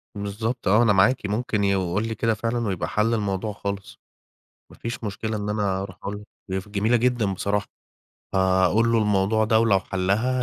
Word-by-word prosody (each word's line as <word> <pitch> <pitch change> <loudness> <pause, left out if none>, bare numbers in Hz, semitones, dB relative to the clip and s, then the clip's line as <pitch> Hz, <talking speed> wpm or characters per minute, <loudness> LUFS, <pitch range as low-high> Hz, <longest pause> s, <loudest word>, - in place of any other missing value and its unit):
بالضبط 105 +4 -3
آه، 105 +5 +5
أنا 110 -3 +4
معاكِ 105 +6 +3
ممكن 105 0 -1
يقول 100 +1 0
لي 110 - -3
كده 115 0 +1
فعلًا 115 +1 -2
ويبقى 95 -3 -2
حَل 110 +2 +1
الموضوع 105 -1 -1
خالص. 100 0 -6 0.7
ما - - -16
فيش 115 0 -5
مشكلة 110 +1 -3
إن 105 0 -4
أنا 100 -2 0
أروح 95 -2 -8
أقول 100 - -3 0.3
له 95 - -2
هي - - -2
ف 105 - -16
جميلة 105 +4 +1
جدًا 120 -4 +1
بصراحة. 100 +2 -1 0.7
هاقول 95 +4 +3
له 115 - +4
الموضوع 105 +1 +2
ده 110 0 +3
ولو 105 -4 +3
حلّها 100 +8 0
105 Hz, 185 wpm, -24 LUFS, 95-115 Hz, 0.7 s, آه